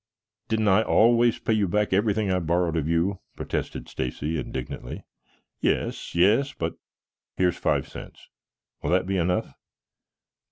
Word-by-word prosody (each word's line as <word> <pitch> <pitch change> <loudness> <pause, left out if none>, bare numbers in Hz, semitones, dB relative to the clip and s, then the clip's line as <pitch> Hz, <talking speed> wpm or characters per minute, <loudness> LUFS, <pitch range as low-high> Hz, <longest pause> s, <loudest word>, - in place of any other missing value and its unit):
"Didn't 110 -1 +1
I 95 +2 +5
always 115 +1 +4
pay 110 - 0
you 105 -3 +2
back 105 +2 +1
everything 105 0 +2
I 90 - +2
borrowed 85 0 0
of 80 -2 0
you?" 85 +4 +1 0.2
protested - - -4
Stacy 75 +5 -3
indignantly. - - -6 0.6
"Yes, - - -1
yes, 110 +11 +4
but 80 0 -3 0.6
here's 90 -1 +2
five - - 0
cents. - - -11 0.5
Will - - -2
that 90 +1 +2
be 95 +1 -1
enough?" 90 +1 0
95 Hz, 135 wpm, -25 LUFS, 85-110 Hz, 0.6 s, I